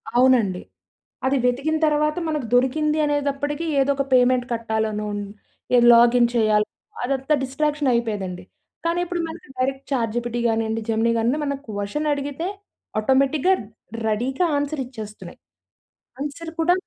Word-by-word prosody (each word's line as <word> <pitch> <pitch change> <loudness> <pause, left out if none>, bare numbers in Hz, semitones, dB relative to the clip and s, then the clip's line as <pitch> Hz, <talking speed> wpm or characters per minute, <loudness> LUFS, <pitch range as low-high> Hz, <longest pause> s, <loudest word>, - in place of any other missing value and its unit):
అవునండి. 240 -7 +4 0.6
అది 270 +1 +2
వెతికిన 280 +6 +1
తర్వాత, 300 +1 +1
మనకు 300 -5 -2
దొరికిందీ 300 +5 +2
అనేదప్పటికీ, 290 +1 -1
ఏదో 275 +1 +3
ఒక 275 - 0
పేమెంట్ 250 -1 +4
కట్టాలనో, 215 -2 -2 0.5
ఏ - - +7 0.2
లాగిన్ 235 0 +5
చేయాలో, 215 -2 +3 0.4
అదంతా 270 +3 0
డిస్ట్రాక్షనయిపోయేదండి. 240 -10 -1 0.4
కానీ 340 +1 +1
ఇప్పుడు 350 -1 -2
మనకి 320 -4 -10
డైరెక్ట్ 270 +1 -1
ఛాట్‌జీపిటి 240 -1 -1
గానీయండి, 225 0 -1
జెమినీ 225 +1 +2
గానీ 240 +6 +1
ఏమన్న 280 -2 -2
క్వషన్ 215 +9 -2
అడిగితే, 285 +4 -3 0.5
ఆటోమేటిక్‌గా, 275 - +3 0.5
రెడీగా 260 +10 0
ఆన్సరిచ్చేస్తున్నాయి. 255 -8 -6 0.8
ఆన్సర్ 310 +3 -5
కూడా 350 +2 +4
260 Hz, 115 wpm, -23 LUFS, 225-295 Hz, 0.8 s, ఏ